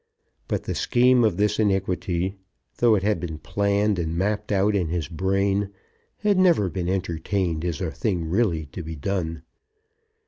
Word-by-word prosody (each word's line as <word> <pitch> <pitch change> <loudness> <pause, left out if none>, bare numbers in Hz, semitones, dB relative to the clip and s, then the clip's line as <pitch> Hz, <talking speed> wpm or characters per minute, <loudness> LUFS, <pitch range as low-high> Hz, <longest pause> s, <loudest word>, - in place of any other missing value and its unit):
But - - -2
the - - -3
scheme 125 0 +3
of 105 -6 +2
this 105 +1 +1
iniquity, 95 -2 0 0.4
though 120 -2 +5
it 95 - -1
had 105 -3 +1
been 80 -2 -5
planned 100 +3 0
and 80 0 -2
mapped 105 +3 -1
out 100 +1 +2
in 90 -4 +1
his 85 -1 -2
brain, 95 +3 0 0.5
had 205 -2 +3
never 170 - +4
been 90 -2 -2
entertained 90 -2 -1
as 90 +1 -2
a 85 -4 -2
thing 85 +1 -2
really 85 -4 +1
to - - -6
be 80 0 -6
done. 80 0 -3
95 Hz, 165 wpm, -24 LUFS, 85-105 Hz, 0.5 s, though